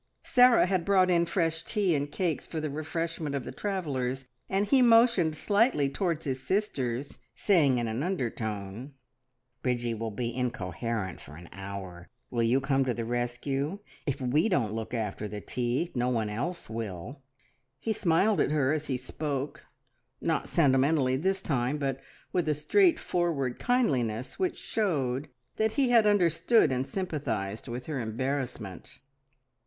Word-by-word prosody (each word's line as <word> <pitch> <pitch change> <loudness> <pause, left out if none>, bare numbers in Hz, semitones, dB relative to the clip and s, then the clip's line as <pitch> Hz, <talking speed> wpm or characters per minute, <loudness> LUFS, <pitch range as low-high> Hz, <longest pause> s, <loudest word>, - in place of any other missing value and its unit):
Sarah 250 -4 +6
had 185 -2 0
brought 185 -1 +4
in 170 -1 +3
fresh 165 -2 0
tea 200 -4 +1
and 145 -1 -1
cakes 175 -5 -1
for 160 - -4
the 155 -2 -3
refreshment 155 0 -3
of 135 - -2
the - - -6
travellers, 135 -10 -2 0.2
and 195 +2 +1
he 265 +4 +4
motioned 230 -9 +5
slightly 205 - +2
towards 165 0 -1
his 130 -2 -2
sisters, 135 - -2 0.2
saying 150 -10 +3
in 120 -1 -1
an 110 +3 -2
undertone, 115 - -3 0.7
"Bridgie 120 -2 0
will 115 0 -3
be 115 +2 -3
incoherent 115 -4 -3
for 75 - -12
an 85 +1 -12
hour. 95 -2 -8 0.2
Will 120 - 0
you 115 +3 +3
come 135 0 +1
to 125 -2 0
the 115 - -3
rescue? 120 - -2 0.3
If 140 0 -1
we 140 - +2
don't 115 - +1
look 115 +2 -4
after 105 -2 -3
the 105 0 -6
tea, 125 - -2
no 125 0 0
one 110 -4 0
else 155 +12 -3
will." 110 - -6 0.6
He 220 +10 -1
smiled 195 0 +2
at - - +3
her 145 -2 +2
as 155 -1 -2
he 130 - 0
spoke, 140 +2 -4 0.5
not 160 -2 -1
sentimentally 135 -3 +3
this 190 +7 0
time, 130 0 0
but 135 -2 -2 0.3
with 175 -3 +1
a 150 - +2
straightforward 170 - +2
kindliness 130 - 0
which 370 -1 0
showed 145 - -1 0.3
that 220 0 +1
he 270 -4 +2
had 230 -3 +6
understood 190 - +4
and 130 +1 -1
sympathised 125 - -3
with 125 +1 -5
her 150 -4 -3
embarrassment. 120 - -4
140 Hz, 155 wpm, -29 LUFS, 120-175 Hz, 0.7 s, Sarah